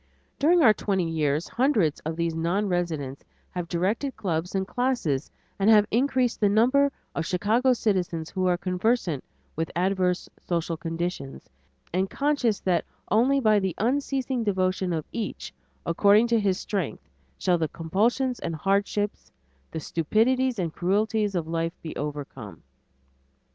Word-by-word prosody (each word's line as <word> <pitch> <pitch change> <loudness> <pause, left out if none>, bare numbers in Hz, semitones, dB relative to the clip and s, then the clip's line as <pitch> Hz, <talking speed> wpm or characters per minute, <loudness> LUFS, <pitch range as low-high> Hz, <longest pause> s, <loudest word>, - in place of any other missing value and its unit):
During 335 +3 +5
our 220 - +7
twenty 190 -5 -1
years 155 -1 0
hundreds 230 - +1
of 160 +1 -4
these 170 0 -1
non 170 +6 0
residents 160 -7 -2 0.3
have 175 -1 -4
directed 200 +11 -1
clubs 175 -1 -2
and 190 0 0
classes, 240 - -1 0.3
and 200 +2 +3
have 210 -2 +7
increased 255 0 +1
the 205 - +3
number 255 +7 +4 0.2
of 165 - -2
Chicago 220 +7 +2
citizens 180 -8 -1
who 185 -1 0
are 180 -1 +2
conversant 180 - 0 0.3
with 165 0 -2
adverse 180 0 +1
social 170 -1 -2
conditions 165 - -5 0.4
and 190 +2 +1
conscious 275 -6 +1
that 175 -3 +1 0.3
only 260 +6 +4
by 215 -4 +4
the 190 -3 -2
unceasing 265 +1 0
devotion 185 -2 0
of 160 -3 -2
each, 225 -4 -5 0.3
according 205 +6 +4
to 230 -1 +3
his 195 -3 +1
strength, 185 - -3 0.3
shall 180 -2 +1
the 160 - +1
compulsions 225 - 0
and 165 -1 -3
hardships, 200 - -1 0.4
the 160 - -5
stupidities 230 - +1
and 170 -4 -2
cruelties 205 +2 0
of 165 -3 -1
life 165 +1 -2
be 160 - -6
overcome. 135 - -6
190 Hz, 145 wpm, -26 LUFS, 165-225 Hz, 0.4 s, our